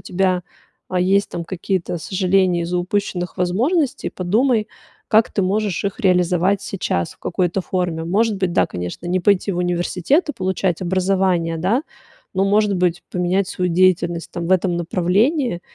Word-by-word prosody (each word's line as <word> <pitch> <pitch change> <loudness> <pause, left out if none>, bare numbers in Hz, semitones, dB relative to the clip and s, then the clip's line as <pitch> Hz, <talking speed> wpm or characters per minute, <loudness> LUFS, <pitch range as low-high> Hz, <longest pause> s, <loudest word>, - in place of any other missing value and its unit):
тебя, 185 -1 0 0.5
а, 180 - 0
есть, 195 +2 +2
там, 170 - -4
какие-то 180 -1 -3
сожаления 185 -1 +1
из-за 180 +1 -1
упущенных 180 -1 -2
возможностей, 245 - 0
подумай, 215 +5 +1 0.4
как 220 +1 +4
ты 200 - 0
можешь 200 0 -1
их 200 -1 -3
реализовать 180 +1 +2
сейчас 90 - -2
в - - -33
какой-то 180 +1 -1
форме. 175 -3 -2
Может 205 +5 +1
быть, 185 -2 -1
да, - - +3
конечно, 90 - -6
не 185 +1 0
пойти 200 +1 +2
в 175 - -3
университет 180 - 0
и - - -6
получать 185 - -1
образование, 185 -2 +1
да, 200 - +1 0.5
но, 190 +1 +2
может 205 0 +2
быть, 175 -1 0
поменять 180 +2 +1
свою 180 -1 -1
деятельность, 175 -1 +2
там, 170 0 -4
в - - +3
этом 180 -1 +2
направлении. 185 - +1
185 Hz, 155 wpm, -20 LUFS, 175-200 Hz, 0.5 s, как